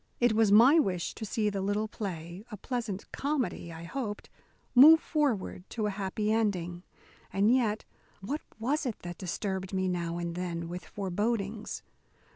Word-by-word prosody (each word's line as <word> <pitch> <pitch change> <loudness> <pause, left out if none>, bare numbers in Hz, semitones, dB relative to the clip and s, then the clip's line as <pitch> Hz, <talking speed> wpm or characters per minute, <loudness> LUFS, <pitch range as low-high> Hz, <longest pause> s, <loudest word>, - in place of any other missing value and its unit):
It 240 -2 +4
was 220 -2 +4
my 250 +10 +8
wish 185 - 0
to 220 - -6
see 210 0 0
the 195 -1 -2
little 205 +2 0
play 180 -3 -6
a 210 - -7
pleasant 225 -4 -4
comedy, 275 - -2
I 165 0 -8
hoped 210 +3 -5 0.4
move 305 +6 +10
forward 275 - -1
to 220 -3 -2
a 210 - 0
happy 200 +2 -1
ending. 180 -6 0 0.5
And 205 +4 +4
yet 225 -4 +1 0.3
what 275 +11 -3 0.2
was 265 +6 0
it 230 - -3
that 175 -1 -7
disturbed 190 +1 -3
me 190 0 +1
now 170 -2 -2
and 170 -1 -3
then 170 -1 -3
with 180 +1 -6
forebodings? 205 +2 -2
205 Hz, 160 wpm, -30 LUFS, 180-230 Hz, 0.5 s, move